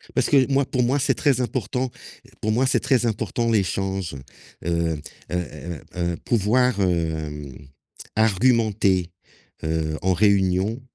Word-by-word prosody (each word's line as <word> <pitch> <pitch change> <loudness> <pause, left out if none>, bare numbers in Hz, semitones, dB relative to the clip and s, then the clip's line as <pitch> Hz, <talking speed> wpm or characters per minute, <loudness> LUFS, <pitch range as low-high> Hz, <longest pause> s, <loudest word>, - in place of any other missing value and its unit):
Parce - - +2
que 135 -1 +4
moi, 135 0 +3
pour 130 -1 -1
moi, 130 +4 +2
c'est 140 - +2
très 135 -4 +2
important. 125 +1 -2 0.5
Pour 110 0 0
moi, 130 +4 +2
c'est - - +2
très 130 -4 +2
important 115 +2 -1
l'échange, 95 -5 -1 0.5
heu 85 -3 0 0.3
heu - - +1
heu 85 -2 -5 0.2
heu, 85 -1 -1
pouvoir, 120 +2 +2
hem, 80 -6 -1 0.6
argumenter, 110 -5 +2 0.5
heu, 80 -1 -1
en 95 0 +2
réunion. 100 +3 +2
100 Hz, 130 wpm, -23 LUFS, 85-120 Hz, 0.6 s, que